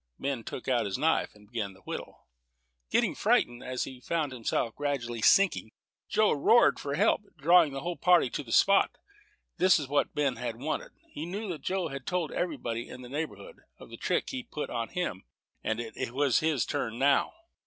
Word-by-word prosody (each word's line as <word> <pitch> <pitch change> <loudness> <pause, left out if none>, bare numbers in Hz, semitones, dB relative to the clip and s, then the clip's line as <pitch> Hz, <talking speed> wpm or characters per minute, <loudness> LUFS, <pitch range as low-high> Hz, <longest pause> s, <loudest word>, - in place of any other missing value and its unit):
Ben 135 -4 -3
took 125 - -7
out 125 -4 +2
his 95 - -2
knife, 160 -6 +1
and 105 0 -18
began 105 -3 -4
to 95 - -19
whittle. - - -7 0.6
Getting - - +2
frightened, 120 0 +1
as 130 0 -2
he 130 -2 -8
found 155 +2 -1
himself 115 -2 -2
gradually 125 -5 -2
sinking, 190 - +4 0.4
Joe 215 0 +3
roared 225 +11 +4
for 140 0 -3
help, 205 +6 +3 0.2
drawing 165 +1 +5
the 135 0 -5
whole 175 0 -3
party 175 -8 +4
to - - -3
the 120 -5 -10
spot. 195 +9 +4 0.6
This 185 +1 +5
was 150 - -3
just 135 - -15
what 145 - +1
Ben 140 -5 0 0.2
wanted. 150 +6 -4 0.2
He 155 +3 -6
knew 205 +5 -4
that 165 -4 -5
Joe 185 -3 -1
had 135 -2 -7
told 180 -4 -1
everybody 120 -9 -3
in 125 - -9
the 125 - -10
neighborhood 160 - -5 0.2
of - - -14
the - - -7
trick - - -1
he 260 -2 -3
put 195 -11 -6
on 115 -2 -2
him, 170 - -3 0.4
and 110 +1 -1
it 115 0 -5
was 140 -2 +3
his 155 -5 +1
turn 120 -6 -3
now. 140 - +2
140 Hz, 195 wpm, -29 LUFS, 120-170 Hz, 0.6 s, drawing